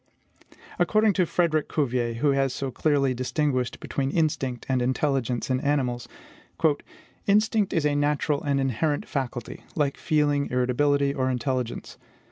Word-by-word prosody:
"According 215 +4 +3
to 180 -2 +2
Frederic 155 -4 +1
Cuvier, 125 -5 0
who 140 +5 +1
has 135 -1 +1
so 135 -1 -3
clearly 140 -2 +1
distinguished 130 0 -1
between 135 -1 -2
instinct 135 -5 -1
and 130 -2 +1
intelligence 130 -1 0
in 130 - +2
animals, 130 -5 0 1.2
'instinct 210 0 +3
is 160 -4 +1
a 150 - +2
natural 145 0 +1
and 140 -1 0
inherent 135 +3 0
faculty, 125 -4 -4
like 145 -2 0
feeling, 145 -2 +1
irritability, 140 +3 +2
or 130 -2 0
intelligence. 125 -1 -3
140 Hz, 130 wpm, -26 LUFS, 130-150 Hz, 1.2 s, According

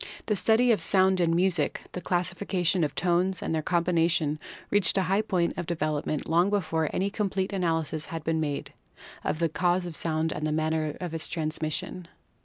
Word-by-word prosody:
The 210 - +1
study 230 +5 +4
of 220 - +2
sound 190 -1 +4
in 165 -1 +2
music, 175 -4 +1
the 180 - -6
classification 180 0 0
of 145 -2 -2
tones 180 +3 +1
and - - -2
their 160 - 0
combination 165 -3 +1 0.3
reached 205 -1 +4
a 190 - +3
high 195 +3 +2
point 180 -5 0
of 175 - -4
development 155 -2 -2
long 170 +4 +3
before 160 -6 0
any 195 +2 -1
complete 195 -2 -2
analysis 165 -4 -1
had 165 -4 -6
been 160 0 0
made 145 -2 -3 0.5
of - - -1
the 165 +1 +1
cause 175 +3 0
of 170 -2 -6
sound 160 0 -1
and 155 - -2
the - - -1
manner 155 -1 -1
of 175 -3 -5
its 160 -1 -1
transmission. 155 +2 -3
170 Hz, 185 wpm, -27 LUFS, 160-185 Hz, 0.5 s, study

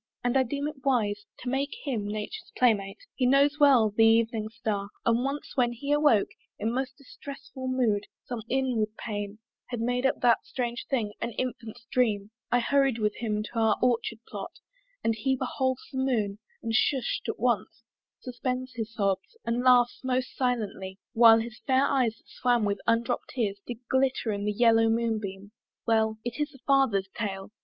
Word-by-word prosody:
And 245 +1 +1
I 265 - +6
deem 280 +3 -2
it 295 -3 -8
wise 210 -6 +1
To 245 - -3
make 275 +2 -1
him 230 -8 -2
Nature's 215 - -5
playmate. 205 -6 +2 0.2
He 255 - +1
knows 280 +3 +4
well 260 -7 +6
The 225 +2 +3
evening 225 -1 +3
star: 210 -3 -3 0.2
and 235 +1 +3
once 275 +2 -3
when 245 -3 +2
he 280 +5 -4
awoke 295 -8 +4 0.3
In 225 - -1
most 260 +1 -3
distressful 275 -1 -9
mood 235 -6 +1 0.2
(some 240 -2 -4
inward 240 -5 0
pain 205 -2 -4 0.3
Had 245 - -4
made 245 +3 +1
up - - -1
that 240 -2 +4
strange 240 -2 -4
thing, 225 -6 0
an 235 - -3
infant's 230 -3 -5
dream) 215 -5 +1 0.2
I 245 - +4
hurried 275 -1 +2
with 210 -2 0
him 215 -2 -1
to 230 +2 -4
our 220 -2 +3
orchard 235 -2 +1
plot, 200 -2 -7 0.5
And 225 - +2
he 265 +5 0
beholds 260 0 -1
the 265 - -3
moon, 215 -6 0 0.2
and 225 -1 -2
hush'd 260 +2 +1
at - - -2
once - - 0 0.4
Suspends 255 +1 -3
his 225 -2 -4
sobs, 200 - -1
and 230 +1 0
laughs 245 -1 +4
most 255 0 -1
silently, 210 -7 -2 0.2
While 225 -1 +8
his 225 0 -4
fair 265 +1 +4
eyes 250 -6 +1
that - - -29
swam 245 -3 +1
with 200 -1 -1
undropt 230 +1 +1
tears 205 -5 -1
Did 240 0 -8
glitter 260 -3 +1
in 205 0 -3
the 210 - +1
yellow 225 +1 +4
moon 225 -1 +1
beam! 200 0 -7 0.3
Well 220 -1 +2
It 240 +2 -4
is 295 -1 -2
a - - -15
father's 265 -9 +3
tale. 195 -3 -4
235 Hz, 180 wpm, -28 LUFS, 215-260 Hz, 0.5 s, While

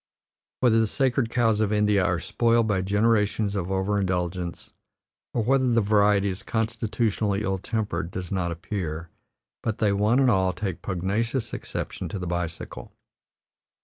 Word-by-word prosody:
Whether 115 -3 +5
the 110 - +3
sacred 130 0 +1
cows 115 -3 +2
of 110 -1 +1
India 105 -2 +3
are 90 -3 +1
spoiled 115 +4 +2
by 100 -3 +1
generations 105 +1 +1
of 95 -3 -2
overindulgence, 95 -3 -1 0.6
or 115 - 0
whether 130 +2 +3
the 120 -1 +3
variety 100 -1 +3
is 95 0 -4
constitutionally 110 -2 -1
evil 95 -2 -1
tempered 95 -6 -2
does 90 -1 -6
not 90 -3 -1
appear, 85 -2 -4 0.5
but 110 -2 -2
they 105 -3 +2
one 105 +4 +3
and 135 -2 +4
all 95 -3 +2
take 95 -1 -4
pugnacious 105 +7 -2
exception - - -5
to 105 - -4
the 90 - -4
bicycle. 85 -1 -4
105 Hz, 145 wpm, -25 LUFS, 95-115 Hz, 0.6 s, Whether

